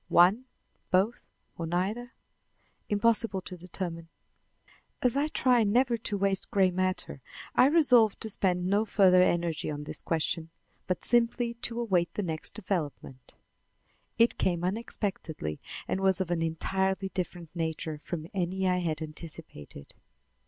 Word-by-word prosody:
One, 195 +9 +5 0.4
both, 195 +6 +1 0.3
or 165 - -2
neither? 205 +9 -2 0.8
Impossible 215 -1 +2
to 185 - -8
determine. 170 -2 -6 0.9
As 250 -1 +2
I 285 +2 +2
try 250 -6 +3
never 240 +4 +3
to 220 -2 -3
waste 195 -1 0
gray 190 -2 +3
matter, 185 -6 -2 0.3
I 255 - +6
resolved 250 -9 +5
to 220 - -2
spend 180 -2 0
no 200 +3 +2
further 190 -4 +5
energy 170 -4 +1
on 150 -1 -4
this 150 - -6
question, 165 0 -2 0.4
but 185 - -1
simply 240 0 +4
to 235 0 -3
await 185 -7 +1
the 205 - -1
next 160 -3 -3
development. 150 - -4 0.8
It 230 +1 +3
came 175 -2 0
unexpectedly 185 - -3 0.3
and - - -1
was 190 -1 +3
of 185 -2 -2
an 170 -1 0
entirely 190 +4 -1
different 175 -3 -5
nature 160 -2 -3
from 155 +1 -5
any 190 0 -1
I 180 0 +2
had 160 -3 -2
anticipated. 155 - -9
185 Hz, 140 wpm, -29 LUFS, 165-220 Hz, 0.9 s, I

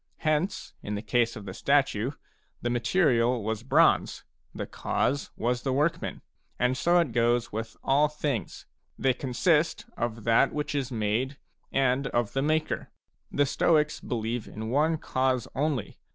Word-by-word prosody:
Hence, 155 +5 0
in 105 - -4
the 105 - -4
case 115 +1 +1
of 105 -3 -8
the 95 - -6
statue, 135 -1 +1 0.5
the 120 - -2
material 120 - +2
was 110 0 -2
bronze, 125 - +3 0.3
the - - -5
cause 140 +2 -1
was 120 +1 0
the 135 - -1
workman. 150 +5 -1 0.3
And 125 +1 +2
so 175 +6 +3
it 170 -7 +2
goes 120 +1 +2
with 110 +1 -5
all 145 +3 +4
things, 145 - -3 0.2
— - - -47
they 130 -1 +2
consist 150 +6 +1
of 115 -2 -3
that 115 +1 +4
which 150 0 -2
is 135 -3 -2
made, 115 +5 -1 0.3
and 135 0 +2
of 120 -3 -1
the 135 - +1
maker. 155 +2 0 0.4
T - - -9
he 145 - +5
Stoics^believe 125 -7 0
in 110 +1 -6
one 155 +4 +2
cause 130 -4 0
only. 140 -5 -2
130 Hz, 155 wpm, -28 LUFS, 115-145 Hz, 0.5 s, he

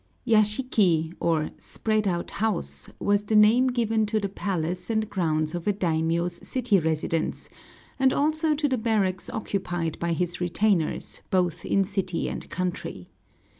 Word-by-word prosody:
Yashiki, 210 -7 +3
or 160 -2 +1
spread 215 -2 -1
out 175 -2 -1
house, 220 -5 -2
was 205 0 +1
the 215 - 0
name 220 +5 +6
given 225 -3 +1
to 215 +1 +1
the 200 - -1
palace 180 -2 -3
and 220 -1 0
grounds 155 -4 0
of 175 +1 -4
a 205 - +3
daimiō's 170 -1 -1
city 245 -6 +2
residence, 160 0 -1 0.5
and 265 0 +4
also 310 +2 +1
to 295 0 +1
the 260 -3 0
barracks 205 -5 0
occupied 175 -6 -3
by 170 0 0
his 175 +1 -2
retainers, 180 -1 0
both 175 -2 +1
in 195 - +2
city 190 -3 -2
and - - -6
country. 175 - -4
195 Hz, 145 wpm, -26 LUFS, 170-220 Hz, 0.5 s, name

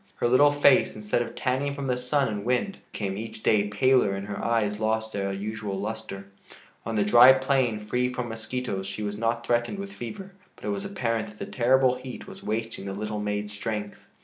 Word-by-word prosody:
Her - - 0
little 140 +4 +6
face, 145 -2 +4
instead 105 +2 -1
of 120 - -5
tanning 140 +2 -1
from 140 -1 -4
the 125 -2 +1
sun 130 +3 +1
and 105 -2 -3
wind, 125 - 0
became 100 -2 -3
each 110 0 -7
day 105 -2 +3
paler 125 -2 +3
and 100 0 -5
her 100 0 -5
eyes 105 -3 +1
lost 110 0 -1
their 100 -1 -1
usual 100 0 -4
luster. 110 -2 -5 0.6
On 115 - -2
the 105 - +3
dry 120 +5 +9
plain, 130 -4 +1
free 125 +4 0
from 125 -1 -3
mosquitoes, 115 -3 -4
she 100 +2 -5
was 105 0 -3
not 115 +1 0
threatened 120 +10 0
with 195 0 -6
fever, 190 - -7 0.2
but - - -12
it - - -1
was 200 -1 -2
apparent 115 - -1
that 105 0 -13
the - - -5
terrible 130 +1 +3
heat 130 0 -8
was 195 0 -11
wasting 110 -1 -3
the 100 - -4
little 105 +1 -4
maid's 105 0 -3
strength. 105 -1 -4
115 Hz, 205 wpm, -26 LUFS, 105-130 Hz, 0.6 s, dry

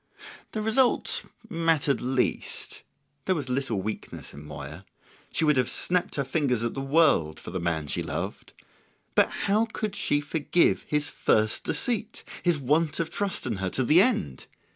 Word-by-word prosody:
The 215 - -2
result 245 +3 +2 0.3
mattered 165 -7 +1
least; 130 0 -1 0.4
there 185 - +2
was 140 -5 -4
little 125 -7 -1
weakness 110 +1 -6
in 70 +1 -10
Moya; 75 +3 -8 0.5
she 160 - +1
would 150 -2 +4
have 125 -2 +2
snapped 180 0 0
her 140 - 0
fingers 135 -4 0
at 115 - -1
the 135 - -4
world 135 - +3
for - - -8
the 95 - -2
man 85 -3 -1
she 70 - -1
loved. - - -5 0.6
But - - +4
how 210 +3 +1
could 210 -2 -3
she 145 - +1
forgive 155 +3 +1
his 150 -1 0
first 110 0 +1
deceit, 225 -2 -2 0.2
his 175 -3 +2
want 150 +3 +1
of 165 -1 -1
trust 200 -6 -1
in 115 -5 -2
her 95 0 -2
to 130 - 0
the 155 +8 +6
end? 200 - 0
145 Hz, 165 wpm, -27 LUFS, 110-175 Hz, 0.6 s, the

